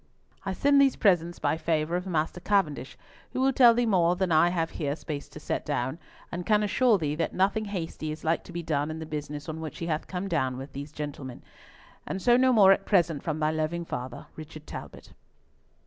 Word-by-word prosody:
"I 195 - -2
send 280 +7 +4
these 275 -1 +4
presents 175 -4 +2
by - - 0
favour 160 0 0
of 180 +1 -3
Master 165 0 -1
Cavendish, 155 - 0 0.4
who - - -2
will 265 +1 +3
tell 240 -2 +7
thee 240 0 +2
more 180 -5 +3
than 185 -1 -1
I 160 +2 +5
have 165 -2 -1
here 145 -3 -2
space 150 -3 -6
to - - -10
set - - -3
down, 130 +6 -2 0.3
and 175 +1 -4
can 210 +2 +3
assure 225 +2 +3
thee 150 -5 -1
that 160 +2 -2
nothing 200 +3 +1
hasty 165 -5 -4
is 155 - -8
like 165 +1 +1
to - - -11
be 170 0 -4
done 150 -2 -1
in 155 - -5
the 160 - -6
business 150 -1 -6
on 160 0 -5
which 155 -2 -6
he 165 - -4
hath 155 -2 -2
come 185 +1 -4
down 130 -8 0
with 135 +2 -8
these 145 +2 -7
gentlemen. 145 -4 -7 0.6
And 190 - -3
so 240 +5 +4
no 260 +1 +4
more 205 -5 +7
at 195 0 +2
present 170 -7 +2
from 155 -2 -2
thy 155 0 +1
loving 160 +2 -2
father, 125 -4 -6
"Richard 155 -1 -10
Talbot." - - -9
165 Hz, 220 wpm, -27 LUFS, 155-195 Hz, 0.6 s, tell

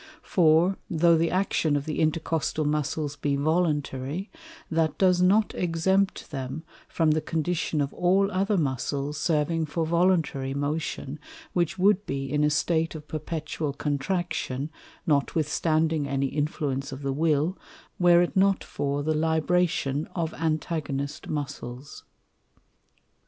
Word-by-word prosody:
For, 170 +1 +3
tho' 170 0 +4
the 165 +1 +2
Action 180 -5 +1
of 145 -1 -1
the 155 - -3
Intercostal 155 -1 0
Muscles 150 0 -1
be 140 0 0
voluntary, 150 +1 -1 0.4
that 160 -1 +1
does 180 -2 +4
not 205 +4 +4
exempt 185 +3 0
them 135 +2 -5 0.2
from 160 -2 +2
the 155 +1 +1
condition 160 -1 -1
of 140 0 -2
all 195 +3 +2
other 195 +2 +1
Muscles 140 0 -1
serving 160 0 +1
for 160 +3 -1
voluntary 160 -6 +1
motion, 145 0 -3 0.3
which 175 +1 0
wou'd 200 +1 +3
be 135 0 -2
in 150 0 +2
a 150 - +4
State 160 +2 +1
of 150 -1 -9
perpetual 155 -1 -3
Contraction, 145 -1 -2 0.3
notwithstanding 155 +1 +1
any 135 0 0
Influence 145 -2 -2
of 135 +1 -7
the 135 0 -1
Will, 155 +3 +1 0.4
were 175 -1 +6
it 175 - -3
not 195 0 +3
for 145 0 -2
the 155 +1 +1
Libration 160 -2 +1
of 165 -3 -1
Antagonist 155 -3 -2
Muscles. 140 -2 -6
155 Hz, 130 wpm, -26 LUFS, 145-170 Hz, 0.4 s, were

